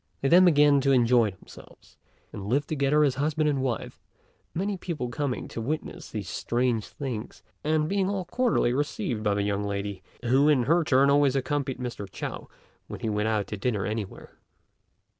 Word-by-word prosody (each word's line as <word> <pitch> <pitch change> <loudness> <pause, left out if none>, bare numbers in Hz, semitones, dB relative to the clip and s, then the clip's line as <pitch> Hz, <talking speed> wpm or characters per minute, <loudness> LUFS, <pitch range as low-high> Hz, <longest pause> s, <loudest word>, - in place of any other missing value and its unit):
They 135 - +1
then 180 +4 +7
began 145 -4 +5
to 135 +1 +2
enjoy 120 -3 +4
themselves, 95 - -16 0.3
and 100 -1 -6
lived 140 +6 +1
together 150 0 +2
as 140 -3 +3
husband 155 +1 +1
and 140 -3 +1
wife, 130 -3 -3 0.5
many 195 +4 -2
people 165 -9 -4
coming 130 +1 -3
to 115 - -5
witness 150 +7 -4
these 105 -5 -5
strange 120 +3 -1
things, 125 -7 -6 0.2
and 155 0 +1
being 195 +1 0
all 195 -2 -2
cordially 235 - +1
received 130 -5 -2
by 105 -1 +1
the 100 - 0
young 100 0 -1
lady, 100 -1 -4 0.2
who 135 +5 +4
in 135 -5 +4
her 165 +7 +3
turn 140 -1 +4
always 140 -1 +3
accompanied 135 0 -1
Mr. 120 -6 -6
Chao - - -6 0.4
when - - -8
he 110 - -1
went 105 0 0
out 105 -2 0
to 105 - -6
dinner 105 -2 -1
anywhere. 105 -2 -6
130 Hz, 180 wpm, -27 LUFS, 110-150 Hz, 0.5 s, then